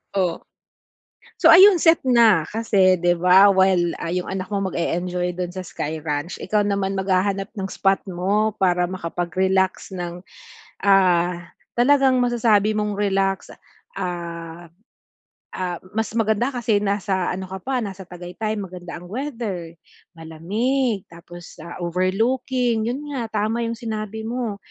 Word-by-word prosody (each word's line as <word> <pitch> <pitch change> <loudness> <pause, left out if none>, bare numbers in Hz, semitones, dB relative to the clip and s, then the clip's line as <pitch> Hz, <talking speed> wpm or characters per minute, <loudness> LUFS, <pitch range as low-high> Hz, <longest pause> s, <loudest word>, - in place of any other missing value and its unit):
Oh. 180 -3 0 1.0
So - - +6
ayun 385 -1 +8
set 325 -1 +5
na. 225 -10 +5
Kasi, 200 -4 +2
'di 175 -1 +2
ba, 185 +3 +6
while, 190 -3 +3
ah, 165 - -4
'yong 180 +1 -2
anak 190 -1 -3
mo 195 -2 -1
mag-e-enjoy 180 +1 -2
do'n 180 -1 -4
sa 185 - -5
Sky 155 0 -4
Ranch, 150 +2 -3
ikaw 210 -1 0
naman 200 -1 -1
maghahanap 195 +1 0
ng 195 -2 -4
spot 195 0 +1
mo 200 +4 0
para 180 -2 +1
makapag-relax 185 +2 -1
ng, 175 0 -6 0.6
ah, 180 -3 +3 0.3
talagang 265 0 +4
masasabi 220 -3 +2
mong 210 -1 -1
relax. 195 -1 0 0.5
Ah 170 -2 -6 0.9
ah, 180 -2 -3 0.2
mas 220 -1 -1
maganda 225 +3 +1
kasi 240 -4 0
nasa 195 -3 -1
ano 185 0 -6
ka 190 0 -6
pa, 265 +6 -3
nasa 190 -1 -7
Tagaytay. 180 +5 -5
Maganda 180 -3 -8
ang 175 - -12
weather, 225 - -5 0.4
malamig, 205 +8 -1
tapos, 175 +1 -12
ah, 170 +2 -9
overlooking. 225 +6 0
'Yon 255 +4 -3
nga, 240 -4 -3 0.2
tama 225 +2 -1
'yong 230 0 -3
sinabi 220 -1 -5
mo. 235 -3 -3
195 Hz, 135 wpm, -22 LUFS, 175-220 Hz, 1.0 s, ayun